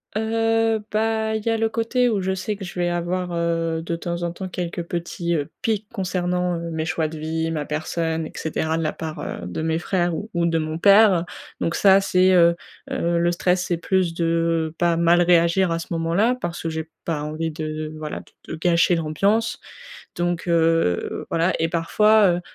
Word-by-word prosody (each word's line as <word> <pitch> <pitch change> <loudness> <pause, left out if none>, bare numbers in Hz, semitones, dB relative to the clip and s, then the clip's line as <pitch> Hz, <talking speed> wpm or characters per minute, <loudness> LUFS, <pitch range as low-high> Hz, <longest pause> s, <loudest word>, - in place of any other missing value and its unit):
Heu, 225 0 +1
bah, 220 0 0
il 215 - -3
y 230 - 0
a 225 - +1
le 225 0 +1
côté 230 +3 +1
où 210 -5 0
je 190 +1 -1
sais 195 +3 -3
que 195 - -9
je 180 0 -7
vais 175 0 +1
avoir, 175 +1 -2
heu, 165 -1 -1
de 170 0 -3
temps 170 +1 -4
en 170 -1 -1
temps, 185 +2 -6
quelques 175 -1 -4
petits, 170 0 -3
heu, 145 -3 -1
piques 215 -2 -1
concernant, 180 -3 -1
heu, 170 0 -5
mes 160 -1 -3
choix 160 0 -1
de 155 0 -8
vie, 160 +1 -2
ma 150 -3 -3
personne 160 +1 -2
et - - -13
cetera 160 0 -2
de 165 - -1
la 155 - -1
part, 160 -1 -6
heu, 90 - -5
de 90 - -4
mes 160 0 0
frères 175 -1 0
ou 215 +5 -6
ou 170 0 +2
de 165 -1 +1
mon 155 +1 -3
père. 200 -2 +5 0.4
Donc, 165 - 0
ça, 195 -1 +5
c'est, 185 -1 +3
heu 170 -1 +5 0.4
heu 170 0 0
le 170 +1 +2
stress, 180 +1 +1
c'est 175 - -1
plus 180 0 0
de 165 -1 0
pas 170 -1 +2
mal 170 +1 +4
réagir 170 +1 +3
à 165 - 0
ce - - -7
moment-là 170 +9 +1
parce 170 -1 -4
que 165 - -2
j'ai 160 0 -4 0.2
pas 150 -3 -2
envie 155 +1 -3
de, 155 0 -5
voilà, 155 -1 -5
de - - -12
de - - -3
gâcher 170 +1 +3
l'ambiance. 195 +8 0 0.6
Donc, 175 0 -2
heu, 165 - +1
voilà, 165 +2 +2
et 165 - +2
parfois, 210 +5 +4
heu, 175 - -1
170 Hz, 210 wpm, -22 LUFS, 165-190 Hz, 0.6 s, père